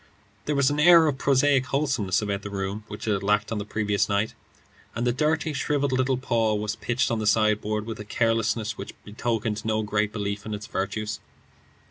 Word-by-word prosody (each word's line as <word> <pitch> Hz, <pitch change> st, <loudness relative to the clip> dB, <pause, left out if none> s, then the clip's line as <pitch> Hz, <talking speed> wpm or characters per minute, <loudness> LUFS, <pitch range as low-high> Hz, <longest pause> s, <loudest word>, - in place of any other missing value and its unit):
There 150 Hz, -, 0 dB
was 140 Hz, 0 st, +3 dB
an 145 Hz, -, -1 dB
air 165 Hz, +1 st, +7 dB
of 140 Hz, -3 st, 0 dB
prosaic 135 Hz, -1 st, +3 dB
wholesomeness 120 Hz, -9 st, 0 dB
about 100 Hz, -1 st, -2 dB
the 100 Hz, -, -6 dB
room 100 Hz, +1 st, -4 dB
which 105 Hz, +1 st, -7 dB
it 105 Hz, -, +3 dB
had 100 Hz, -, -1 dB
lacked 105 Hz, +2 st, +1 dB
on 110 Hz, -, -1 dB
the 100 Hz, -, -4 dB
previous 105 Hz, -1 st, 0 dB
night, 100 Hz, +2 st, 0 dB, 0.6 s
and 120 Hz, +2 st, -1 dB
the 120 Hz, -, +3 dB
dirty, 155 Hz, +4 st, 0 dB
shrivelled 140 Hz, -1 st, 0 dB
little 130 Hz, 0 st, +1 dB
paw 115 Hz, -4 st, +1 dB
was 105 Hz, 0 st, -2 dB
pitched 120 Hz, +2 st, -1 dB
on 115 Hz, -, 0 dB
the 110 Hz, -, -1 dB
sideboard 105 Hz, 0 st, +2 dB
with 110 Hz, -1 st, -6 dB
a -, -, -5 dB
carelessness 115 Hz, 0 st, 0 dB
which -, -, -7 dB
betokened 110 Hz, 0 st, -2 dB
no 110 Hz, -1 st, 0 dB
great 105 Hz, 0 st, 0 dB
belief 100 Hz, -1 st, -3 dB
in 110 Hz, -1 st, -4 dB
its 105 Hz, -, -7 dB
virtues. 105 Hz, +3 st, -3 dB
110 Hz, 200 wpm, -25 LUFS, 105-130 Hz, 0.6 s, air